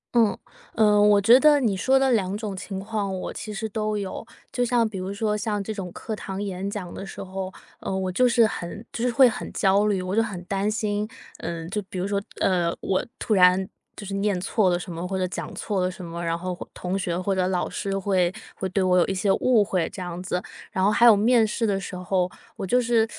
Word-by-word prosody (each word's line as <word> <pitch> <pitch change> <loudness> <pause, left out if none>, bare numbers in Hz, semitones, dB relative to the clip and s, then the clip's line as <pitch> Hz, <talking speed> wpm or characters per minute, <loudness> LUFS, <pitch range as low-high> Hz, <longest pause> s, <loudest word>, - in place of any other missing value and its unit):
嗯， 225 -3 +4 0.4
呃， 210 -2 +5
我 205 -1 +6
觉 230 +6 +7
得 295 -1 +6
你 220 -7 +1
说 265 +8 +3
的 265 -1 +3
两 200 -3 +1
种 210 -3 -4
情 190 +1 -5
况， 200 -1 -3
我 - - -5
其 215 - -6
实 220 +2 -3
都 215 0 -2
有。 200 +1 -4 0.3
就 245 - 0
像 240 -2 +2
比 195 -4 -6
如 185 +2 -4
说 210 +1 -1
像 210 -1 -1
这 215 +2 -4
种 190 -4 -6
课 220 +5 -5
堂 195 -1 -5
演 195 -1 -3
讲 195 -4 -6
的 - - -7
时 195 - -7
候， 190 0 -5 0.3
呃， 190 - -3
我 190 -1 -1
就 250 +6 +3
是 235 -1 +5
很 205 +1 -5
就 235 - -3
是 250 - +2
会 255 +2 +7
很 230 - -4
焦 200 +1 +3
虑， 190 -3 0
我 185 +2 -2
就 225 - +4
很 195 -6 -4
担 200 +2 0
心， 210 -1 -1 0.3
嗯， 165 -1 -5
就 210 - -1
比 - - -6
如 180 +2 -1
说， 200 0 0 0.2
呃， 175 -3 +2
我 190 - 0
突 220 - -1
然 185 0 +5 0.3
就 205 - -8
是 195 - -5
念 200 -2 0
错 195 +1 +2
了 175 - +2
什 180 - -7
么， 170 +2 -4
或 190 0 -2
者 185 - 0
讲 - - -6
错 200 -4 -2
了 180 - +1
什 185 0 -9
么， 170 +1 -6
然 165 0 0
后 180 +1 -4 0.2
同 180 +2 -2
学 175 -3 -2
或 195 +2 0
者 185 -1 +1
老 185 -1 0
师， 195 -1 -3
会 185 -2 +1 0.2
会 190 - -3
对 190 +1 0
我 180 0 +3
有 - - +4
一 - - -1
些 195 +1 +1
误 240 -4 +3
会 185 -4 0
这 - - -10
样 175 0 -5
子。 180 -1 -2 0.3
然 190 - 0
后 200 - +5
还 235 +3 +4
有 225 - +9
面 225 +2 +4
试 225 +2 -1
的 195 -1 +1
时 185 - -7
候， 180 0 0 0.3
我 - - -4
就 250 +7 +3
是 230 -2 +2
195 Hz, 265 characters per minute, -25 LUFS, 185-215 Hz, 0.4 s, 有